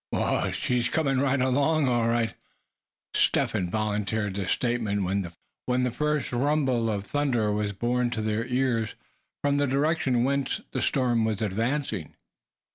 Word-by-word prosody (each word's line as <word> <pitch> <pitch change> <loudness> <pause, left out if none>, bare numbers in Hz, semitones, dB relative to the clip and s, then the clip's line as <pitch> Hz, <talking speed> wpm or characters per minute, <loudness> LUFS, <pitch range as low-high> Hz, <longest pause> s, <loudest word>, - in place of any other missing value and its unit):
"Whoo! - - 0
she's 125 -3 0
coming 135 -5 +1
right 140 0 +2
along, 140 +4 +2
all 120 -2 +2
right." 115 -1 +1 0.8
Step - - +2
Hen 90 - -1
volunteered 105 0 -1
this 95 -1 -3
statement, 115 -5 0 0.6
when 125 0 +1
the 125 - +1
first 150 +2 -1
rumble 130 -3 +1
of 100 -2 -2
thunder 120 -6 0
was 105 0 -1
borne 120 +4 0
to 115 -2 -3
their 110 +2 -1
ears 125 -3 0 0.5
from 145 0 +2
the 145 0 +2
direction 135 -3 +1
whence 140 0 0
the - - -2
storm 125 -4 +2
was 110 -1 -1
advancing. 110 - -2
120 Hz, 145 wpm, -27 LUFS, 110-135 Hz, 0.8 s, right